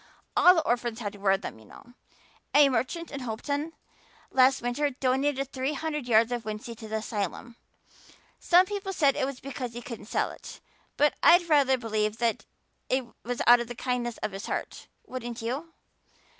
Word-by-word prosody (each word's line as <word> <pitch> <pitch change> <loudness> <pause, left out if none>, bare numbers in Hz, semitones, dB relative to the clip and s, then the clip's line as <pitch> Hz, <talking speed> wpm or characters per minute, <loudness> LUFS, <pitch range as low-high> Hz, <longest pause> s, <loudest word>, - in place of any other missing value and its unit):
All 360 +1 +7
the 325 - +2
orphans 240 -1 0
had 205 -3 -4
to 205 - -13
wear 195 -1 +3
them, 110 - -8
you 110 - -17
know. 240 - -16 0.6
A 290 -1 +7
merchant 265 +7 -2
in 280 - -5
Hopeton 285 +6 -3 0.6
last 260 0 +5
winter 245 +5 0
donated 270 +1 0
three 265 +2 -2
hundred 300 -2 -3
yards 230 0 +4
of 240 -2 -2
wincey 215 +2 -6
to 220 - -9
the 220 - -4
asylum. 220 +1 -4 0.8
Some 355 +1 +5
people 390 0 -4
said 285 -6 +3
it 265 - 0
was 275 -2 -6
because 255 -3 -6
he 240 - -6
couldn't 235 -7 -8
sell - - -1
it, - - -11 0.4
but 295 +1 +4
I'd 345 0 +6
rather 280 -4 +4
believe 215 -2 -1
that 235 -2 0 0.4
it 260 0 +1 0.2
was 245 +1 -2
out 240 0 +8
of 240 - -4
the 245 - -7
kindness 245 -1 -2
of - - -1
his 195 +1 -7
heart, - - -5 0.2
wouldn't 240 -2 -6
you? 275 +8 -4
250 Hz, 185 wpm, -28 LUFS, 230-285 Hz, 0.8 s, out